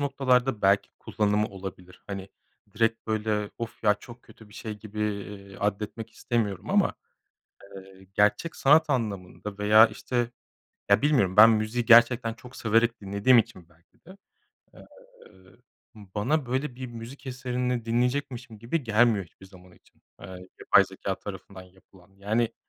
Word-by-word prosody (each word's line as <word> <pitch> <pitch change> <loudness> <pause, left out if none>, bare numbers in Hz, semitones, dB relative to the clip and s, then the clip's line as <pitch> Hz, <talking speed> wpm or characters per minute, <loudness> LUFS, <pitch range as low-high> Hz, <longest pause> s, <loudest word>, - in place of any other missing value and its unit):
noktalarda 130 -4 +1
belki 100 +1 +3
kullanımı 105 0 0
olabilir. 95 -2 -10
Hani, 100 -1 -6 0.5
direkt, 115 0 0
böyle, 105 -1 -1
"Of, 115 -1 -7
ya, 105 -1 +5
çok 120 +4 -14
kötü 110 -2 -17
bir 105 - -18
şey." 110 -3 -7
gibi, 105 0 -8
eee, 100 -1 -5
addetmek 105 +2 -3
istemiyorum 105 -8 -3
ama, - - +2 0.8
eee, 95 0 -14
gerçek 105 +12 +1
sanat 150 +3 +4
anlamında 105 -4 -4
veya, 110 +2 +7
işte 120 0 -3 0.6
Ya, 100 - +5
bilmiyorum. 125 -11 +2
Ben 110 +2 +9
müziği 110 +2 0
gerçekten 120 0 +5
çok 125 +2 -14
severek 115 +1 +1
dinlediğim 100 +5 +3
için 110 -7 -2
belki 85 0 -31
de, 185 +3 -14 0.6
eee, - - -15 1.1
bana, 105 +9 -2
böyle, 130 +2 -3
bir 130 +1 -6
müzik 120 +4 -10
eserini 125 -2 -3
dinleyecekmişim 125 -1 -2
gibi 130 +8 -2
gelmiyor 110 -3 +2
hiçbir 90 +3 -18
zaman 90 -1 -17
için, - - -27 0.2
eee, - - -9 0.3
yapay 100 - +5
zekâ 95 0 -5
tarafından 95 -1 -9
yapılan. 95 0 -22
Yani, 110 +4 -1
110 Hz, 140 wpm, -26 LUFS, 100-120 Hz, 1.1 s, Ben